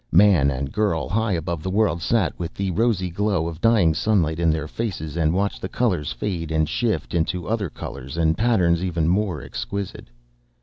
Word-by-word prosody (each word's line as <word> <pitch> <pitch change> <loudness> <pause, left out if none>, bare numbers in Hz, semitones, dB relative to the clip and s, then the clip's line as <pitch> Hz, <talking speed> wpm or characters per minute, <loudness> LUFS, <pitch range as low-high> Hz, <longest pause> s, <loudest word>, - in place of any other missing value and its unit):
Man 90 -6 +5
and 70 +1 -3
girl, 100 -7 0
high 110 0 0
above 85 -1 -2
the 95 - -3
world, 95 -4 +1
sat 110 -1 +1
with 85 -2 -5
the 95 -1 -1
rosy 95 -3 +1
glow 100 -3 0
of 85 0 -7
dying 110 -8 +4
sunlight 85 -4 +1
in 85 -1 +3
their 80 -1 0
faces 80 -7 -4
and 80 -2 +2
watched 100 +3 -1
the 95 - -4
colors 90 - 0
fade 80 +5 -3
and 80 -1 +2
shift 115 - -1
into 85 +1 -1
other 110 -5 -1
colors 70 +1 -8
and 80 -1 +2
patterns 90 -7 +2
even 85 -3 0
more 90 -5 0
exquisite. 100 +8 -5
85 Hz, 185 wpm, -23 LUFS, 80-105 Hz, -, Man